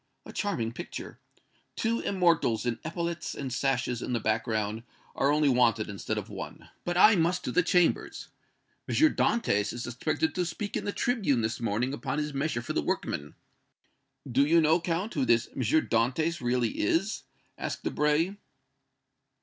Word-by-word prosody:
A - - -10
charming 120 - -1
picture! - - -8 0.6
Two 230 +1 0
immortals 170 - +2
in 115 -2 -1
epaulets 170 +1 -3
and 135 -3 -4
sashes 125 -2 0
in 125 - -3
the 120 - +1
background 110 -1 -1 0.3
are 140 - +2
only 150 0 +3
wanted 115 -5 +3
instead 100 - -3
of - - -4
one. - - -8
But 175 0 -2
I 210 +4 +8
must 175 +1 +1
to - - -2
the - - +4
Chambers. 175 0 +1 0.6
M. - - -1
Dantès 230 - +2
is 120 0 -5
expected 145 +6 -1
to 180 - 0
speak 195 +4 -4
in - - -2
the 205 - -1
tribune 200 - +1
this 110 +1 -2
morning 115 +3 -1
upon 140 -1 -3
his 150 -1 -2
measure 135 -3 -1
for - - -4
the - - +1
workmen." 75 +1 -3 0.9
"Do 130 +2 +3
you 165 +4 +4
know, 160 +2 +4
Count, 175 +5 -2
who 140 - 0
this 120 -1 +2
M. 135 - -2
Dantès 135 +4 +1
really 120 -2 0
is?" 185 - +1 0.3
asked - - -5
Debray. 155 +6 +1
140 Hz, 165 wpm, -28 LUFS, 120-170 Hz, 0.9 s, I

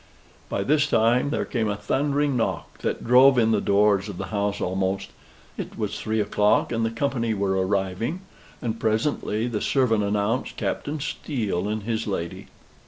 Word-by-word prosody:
By 100 - -1
this 145 +4 +3
time 120 +2 +3
there 150 - -1
came 115 -4 -1
a 105 - -1
thundering 140 +6 0
knock, 115 - -2
that - - -2
drove 130 +2 +6
in 115 -2 +4
the 105 -2 +2
doors 100 0 +3
of 95 - -7
the - - -5
house 100 0 0
almost. 95 +1 -1 0.5
It - - -6
was - - -3
three 110 0 -1
o'clock, 105 +1 +2
and 115 -1 0
the 115 - +1
company 115 -2 -1
were 100 -1 0
arriving; 100 - -1 0.4
and 115 -1 -2
presently 110 -1 0
the 115 -4 -2
servant 115 -6 +2
announced 105 +4 -1
Captain 150 +1 -2
Steele 120 - -2
and 105 0 -2
his 115 0 -2
lady. 85 -4 -4
110 Hz, 170 wpm, -24 LUFS, 100-125 Hz, 0.5 s, drove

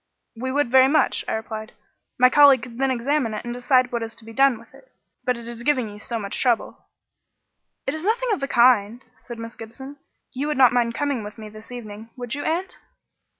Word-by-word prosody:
"We 255 +3 -4
should 280 -2 0
very 260 0 +7
much," 305 +2 +2
I - - -1
replied. 220 0 -5 0.4
"My 255 - +7
colleague 280 -3 +6
could 245 -1 -9
then 270 0 +2
examine 255 -2 0
it 215 - -6
and 240 - -4
decide 250 0 +2
what 235 -1 -2
is 225 0 -6
to 225 - -11
be 225 - -10
done 270 -1 +4
with 235 - -18
it. - - -19 0.3
But 250 -1 +1
it 235 -1 -10
is 235 -1 -7
giving 255 -3 +1
you 205 0 -11
so 230 +2 -4
much 200 -3 -3
trouble." 240 -3 0 1.0
"It 270 - -1
is 315 +1 -6
nothing 465 +4 0
of 410 - 0
the 275 - -2
kind," 240 -1 +3
said 230 +1 -10
Miss 230 0 -7
Gibson. 265 +6 -10 0.4
"You 275 +3 -3
would 300 - -1
not 255 -2 +6
mind 235 -1 +1
coming 280 -6 -1
with 210 +2 -9
me 215 -1 -9
this 215 +3 -13
evening, 220 -2 -9
would 245 -1 -5
you, 290 - -4
aunt?" 350 +4 -2
245 Hz, 225 wpm, -23 LUFS, 225-275 Hz, 1.0 s, very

